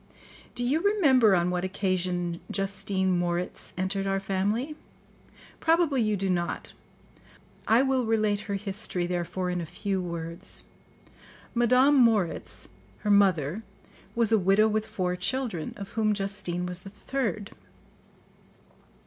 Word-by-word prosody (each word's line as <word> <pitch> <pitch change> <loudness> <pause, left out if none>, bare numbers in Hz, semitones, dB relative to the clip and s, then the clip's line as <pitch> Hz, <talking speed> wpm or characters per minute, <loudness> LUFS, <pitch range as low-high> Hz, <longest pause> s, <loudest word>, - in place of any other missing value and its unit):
Do 245 - -2
you 280 +7 +1
remember 275 - +5
on 175 0 +1
what 180 0 -1
occasion 180 -2 -1
Justine 195 -2 0
Moritz 175 0 -2
entered 195 +1 -1
our 195 0 +1
family? 205 +9 -1 0.8
Probably 325 -5 +3
you 215 -2 +1
do 195 +1 -1
not; 175 -2 -2 0.9
I 230 +4 +5
will 265 -2 +1
relate 215 -2 +2
her 200 - 0
history, 195 -2 -3
therefore 180 +1 -2
in 180 -1 -2
a - - -4
few 190 +3 -2
words. 170 +1 -5 0.9
Madame 250 +4 +4
Moritz, 225 -8 +1 0.3
her 210 - +1
mother, 190 -3 +3 0.5
was 230 -2 +2
a 220 - +5
widow 195 +3 +4
with 215 0 -1
four 180 -3 -1
children, 190 -3 -2
of 200 -1 -7
whom 215 -2 +1
Justine 195 -3 -2
was 180 0 -4
the 195 - -10
third. 215 -1 -3
195 Hz, 130 wpm, -27 LUFS, 180-225 Hz, 0.9 s, remember